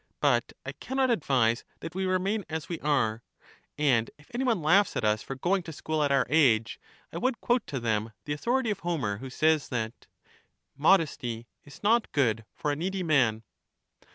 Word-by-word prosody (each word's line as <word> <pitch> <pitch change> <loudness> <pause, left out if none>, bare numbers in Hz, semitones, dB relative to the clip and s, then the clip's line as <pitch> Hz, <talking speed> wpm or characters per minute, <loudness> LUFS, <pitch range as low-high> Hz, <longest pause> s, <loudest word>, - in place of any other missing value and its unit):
But - - +2
I - - -3
can 265 - -6
not 260 -2 +3
advise 125 - +2 0.2
that 165 - -6
we 190 +1 -1
remain 190 +3 0
as 160 -1 -4
we 170 - -4
are. 120 -7 +1 0.6
And 130 -7 +2
if 145 - -21
any 245 +2 -1
one 230 - +1
laughs 195 +7 +4
at - - -1
us 105 0 +2
for 135 - -6
going 185 +8 +1
to 165 - -8
school 155 0 -2
at 145 -1 +2
our 135 -1 +3
age, 120 -7 +3 0.3
I 170 - -3
would 255 +4 0
quote 245 -2 +1
to 135 - -3
them 110 -1 -1
the 145 - -2
authority 235 - 0
of 200 - -3
Homer, 150 - -2
who 130 - -7
says, 155 +3 +2
that 110 -2 -4 0.7
Modesty 140 -7 +2 0.2
is 145 - -14
not 225 +2 +3
good 115 -6 +1
for 150 - -1
a - - -1
needy 185 +4 -2
man." 125 -9 +2
150 Hz, 190 wpm, -28 LUFS, 120-190 Hz, 0.7 s, laughs